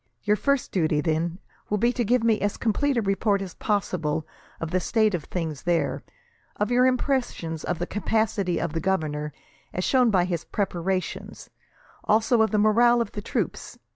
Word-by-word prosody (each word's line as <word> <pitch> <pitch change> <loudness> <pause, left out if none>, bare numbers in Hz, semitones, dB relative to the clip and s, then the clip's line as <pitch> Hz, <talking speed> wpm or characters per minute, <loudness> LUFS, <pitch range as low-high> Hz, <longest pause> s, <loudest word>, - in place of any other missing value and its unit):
Your 210 0 +3
first 280 +4 0
duty, 155 -5 +1
then, 165 +2 0 0.3
will 210 - +1
be 235 +4 +2
to 245 - 0
give 240 +2 +2
me 225 -2 +2
as 205 0 -1
complete 260 +5 +1
a 230 - +1
report 200 +1 +1
as 190 -2 -6
possible 170 -7 -1 0.3
of 165 0 -4
the 185 - +2
state 215 +3 +2
of 170 -5 -2
things 160 -5 -4
there; 175 -1 0 0.5
of 210 +3 -1
your 250 +1 +5
impressions 250 - -1
of 180 - -2
the 175 - -2
capacity 210 -3 0
of 170 -2 -2
the 165 - -1
governor, 150 -5 -1 0.4
as 180 - -2
shown 250 +1 +4
by 185 -4 +3
his 170 -2 -2
preparations; 185 -2 -3 0.5
also 220 +2 +3
of 220 - +3
the 215 - 0
morale 235 +3 +5
of 235 - -1
the 205 - -5
troops. - - -3
200 Hz, 180 wpm, -25 LUFS, 170-225 Hz, 0.5 s, your